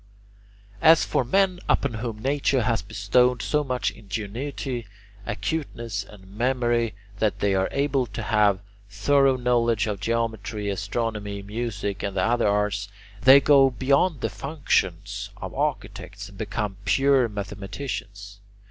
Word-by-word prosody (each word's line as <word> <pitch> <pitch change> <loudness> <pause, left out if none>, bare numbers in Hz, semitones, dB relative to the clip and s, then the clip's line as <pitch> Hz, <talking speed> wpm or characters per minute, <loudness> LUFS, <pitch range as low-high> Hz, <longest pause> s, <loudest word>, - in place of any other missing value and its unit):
As 165 0 +6
for - - +1
men 185 +7 +2
upon 140 -4 +2
whom 110 0 -4
nature 135 -2 +1
has 115 -2 +1
bestowed 115 +5 +1
so 150 0 +1
much 130 -2 -1
ingenuity, 115 +4 -5 0.4
acuteness, 120 -10 -3
and 100 -1 -15
memory 120 +1 0 0.2
that 110 -2 +1
they 100 -1 +2
are 95 0 +1
able 140 -2 0
to 105 - -6
have 105 -2 +3
a - - -20 0.3
thorough 135 +6 +3
knowledge 120 -3 +2
of 105 -3 -3
geometry, 110 -2 -2
astronomy, 105 0 -3
music, 105 -2 -4
and 100 -1 -3
the 90 - +2
other 120 -1 +2
arts, 105 -1 0 0.3
they 135 +2 +9
go 140 -1 +5
beyond 140 +4 +1
the - - 0
functions 100 - -1
of - - -7
architects - - -4
and - - -15
become 105 -2 -3
pure 135 +3 +3
mathematicians. 100 0 -6
115 Hz, 135 wpm, -25 LUFS, 100-130 Hz, 0.4 s, they